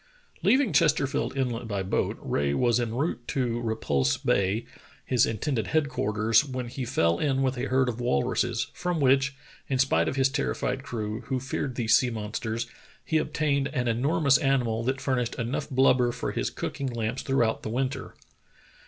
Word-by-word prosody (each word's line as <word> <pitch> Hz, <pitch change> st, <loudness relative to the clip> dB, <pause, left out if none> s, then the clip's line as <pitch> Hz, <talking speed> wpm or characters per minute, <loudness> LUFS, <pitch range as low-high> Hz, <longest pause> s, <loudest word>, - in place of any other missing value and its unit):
Leaving 260 Hz, -5 st, +3 dB
Chesterfield 145 Hz, -4 st, +2 dB
Inlet 120 Hz, -3 st, -1 dB
by 100 Hz, -3 st, -2 dB
boat, 95 Hz, -, -1 dB
Rae 70 Hz, 0 st, -1 dB
was 120 Hz, -, +2 dB
en 115 Hz, -1 st, -2 dB
route 140 Hz, 0 st, -1 dB
to 120 Hz, -3 st, -1 dB
Repulse 70 Hz, -, 0 dB
Bay, 100 Hz, +4 st, +1 dB, 0.4 s
his 125 Hz, -3 st, +3 dB
intended 115 Hz, 0 st, -2 dB
head 155 Hz, -3 st, +1 dB
quarters, 110 Hz, +1 st, +2 dB
when 130 Hz, -4 st, -5 dB
he 130 Hz, +1 st, -4 dB
fell 85 Hz, -6 st, +1 dB
in 135 Hz, -2 st, +1 dB
with 130 Hz, 0 st, +1 dB
a 125 Hz, -, -2 dB
herd 130 Hz, 0 st, +2 dB
of 120 Hz, 0 st, -3 dB
walruses, 115 Hz, -, 0 dB
from 180 Hz, -2 st, -2 dB
which, 135 Hz, 0 st, +3 dB, 0.3 s
in 135 Hz, -, 0 dB
spite 135 Hz, +1 st, +2 dB
of -, -, -1 dB
his 135 Hz, 0 st, +3 dB
terrified 135 Hz, -1 st, -2 dB
crew, 110 Hz, -4 st, -4 dB
who 130 Hz, -1 st, -1 dB
feared 130 Hz, 0 st, -3 dB
these 115 Hz, -2 st, +3 dB
sea 125 Hz, -, +3 dB
monsters, 110 Hz, +1 st, -3 dB, 0.4 s
he 160 Hz, -, +2 dB
obtained 140 Hz, -3 st, 0 dB
an 125 Hz, -4 st, 0 dB
enormous 140 Hz, +4 st, +3 dB
animal 125 Hz, -6 st, +1 dB
that 130 Hz, +2 st, -1 dB
furnished 125 Hz, -4 st, -1 dB
enough 120 Hz, +5 st, -3 dB
blubber 130 Hz, -2 st, +4 dB
for 125 Hz, -, -3 dB
his -, -, -1 dB
cooking 140 Hz, -, -4 dB
lamps 120 Hz, 0 st, -2 dB
throughout 120 Hz, -5 st, +1 dB
the -, -, -5 dB
winter. 130 Hz, +2 st, -3 dB
125 Hz, 170 wpm, -27 LUFS, 115-135 Hz, 0.4 s, blubber